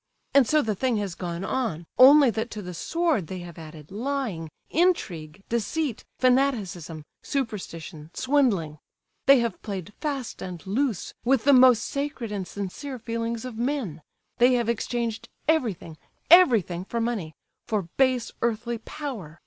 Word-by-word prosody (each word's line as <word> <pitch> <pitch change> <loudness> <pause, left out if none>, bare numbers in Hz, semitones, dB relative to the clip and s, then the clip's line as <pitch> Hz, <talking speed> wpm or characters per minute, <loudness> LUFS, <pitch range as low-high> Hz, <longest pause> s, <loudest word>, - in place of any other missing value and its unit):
And 275 -4 +6
so 305 +3 +3
the 220 - 0
thing 245 +3 0
has 200 -4 -2
gone 175 0 -5
on, 205 -11 -2
only 275 0 +8
that 225 +2 -3
to 210 -2 -7
the 180 0 -6
sword 320 - 0
they 185 - -5
have 170 -2 -10
added 155 -1 -11
lying, 225 - -3 0.2
intrigue, 195 - 0
deceit, 235 +3 -2
fanaticism, 210 - +1 0.2
superstition, 180 - -5
swindling;—they 255 - +1
have 235 -1 -3
played 200 -1 -6
fast 280 -5 -3
and 180 -3 -7
loose 225 0 -1
with 255 -2 +2
the 280 - +5
most 250 -3 +7
sacred 280 -5 -3
and 195 -3 -3
sincere 205 - -6
feelings 230 0 -3
of 235 -3 -7
men;—they 245 - -1
have 240 -2 +1
exchanged 235 0 -2 0.2
everything—everything 225 - +3
for 235 - -3
money, 220 -10 -2 0.3
for 215 -3 0 0.2
base 255 -3 +2
earthly 235 0 -1
_power! 220 - -7
230 Hz, 135 wpm, -26 LUFS, 180-260 Hz, 0.3 s, only